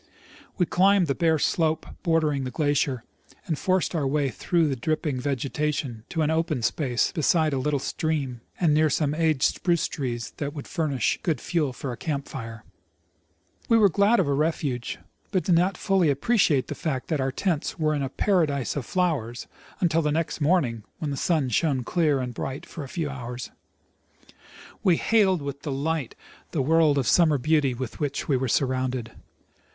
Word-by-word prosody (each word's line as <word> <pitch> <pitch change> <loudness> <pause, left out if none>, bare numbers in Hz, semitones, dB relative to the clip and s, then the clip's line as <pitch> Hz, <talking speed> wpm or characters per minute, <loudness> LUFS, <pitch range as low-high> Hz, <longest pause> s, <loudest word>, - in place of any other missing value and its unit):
We 180 - +3
climbed 190 +2 +4
the 140 - 0
bare 160 +1 +2
slope 160 +1 +1 0.2
bordering 155 -5 +1
the 130 - -3
glacier, 140 -3 0 0.4
and 160 - -1
forced 185 +5 0
our 150 -5 0
way 140 0 +1
through 170 +4 +1
the 140 - -1
dripping 145 +1 -1
vegetation 140 -2 -2
to 160 -2 0
an 155 - +1
open 160 -6 0
space 125 +2 +1
beside 160 -2 +2
a 135 - 0
little 145 +2 0
stream 140 -4 -2 0.2
and 165 -4 +3
near 155 +1 +4
some 145 +1 +1
aged 155 -3 +1
spruce 170 -3 +2
trees 120 -5 -4
that 145 0 -4
would 145 - -7
furnish 150 -6 0
good 160 -4 0
fuel 155 -6 0
for 130 +1 -5
a 120 - -6
camp 145 -3 -3
fire. 115 -3 -7 1.1
We 230 - +6
were 210 -3 +6
glad 200 +7 +4
of - - +2
a 140 - +1
refuge, 140 -5 -1 0.3
but 185 -3 0
did 185 - +2
not 180 +3 +2
fully 190 -5 +2
appreciate 145 - +2
the - - -5
fact 135 -6 -3
that 155 -4 0
our 135 0 0
tents 170 +2 -1
were 155 -2 +1
in 145 - -1
a 135 - -2
paradise 150 - +1
of 140 -5 -4
flowers 150 -11 -1 0.4
until 165 -2 +3
the 150 -1 0
next 160 +1 -2
morn 170 +2 +4
ing, 115 -3 -6
when 150 -2 -3
the - - -2
sun 150 -1 +1
shone 135 0 +1
clear 150 0 +1
and 125 -1 -4
bright 135 +3 -5
for 155 - -8
a 135 - -9
few 165 -2 -2
hours. 125 -3 -6 1.3
We 175 -3 +3
hailed 195 -7 +3
\\\i\\ 140 - -2
delight 145 -1 -2 0.4
the 145 -5 +1
world 155 0 +4
of 135 - +1
summer 160 -4 +4
beauty 145 -1 +2
with 125 -1 -6
which 145 -2 -2
we 140 - +2
were 130 +1 0
surrounded. 130 -2 0
150 Hz, 185 wpm, -25 LUFS, 130-165 Hz, 1.3 s, We